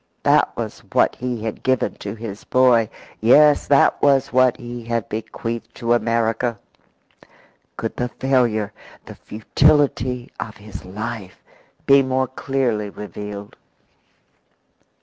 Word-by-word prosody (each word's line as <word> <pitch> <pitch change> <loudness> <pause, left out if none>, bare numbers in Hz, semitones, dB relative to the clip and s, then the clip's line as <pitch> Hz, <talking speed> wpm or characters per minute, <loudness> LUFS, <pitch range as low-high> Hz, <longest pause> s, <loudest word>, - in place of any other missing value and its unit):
That - - +3
was - - -5
what - - +3
he 125 -3 -4
had 110 -2 -4
given 130 -1 +1
to - - -6
his 110 -2 -8
boy. 125 -4 +3 0.3
Yes, 145 +6 +5
that 140 -1 +4
was 135 -2 +3
what 130 -1 +4
he 120 0 -8
had 115 -2 -2
bequeathed 115 +1 -5
to 120 -1 0
America. 115 0 0 1.2
Could 115 - -4
the 125 0 -1
failure, 120 -6 0 0.3
the - - -9
futility 125 +1 +1
of 110 0 -6
his 105 -2 -10
life 105 0 -7 0.4
be 140 0 +6
more 130 0 0
clearly 125 -5 -2
revealed? 105 0 -8
120 Hz, 120 wpm, -21 LUFS, 110-130 Hz, 1.2 s, be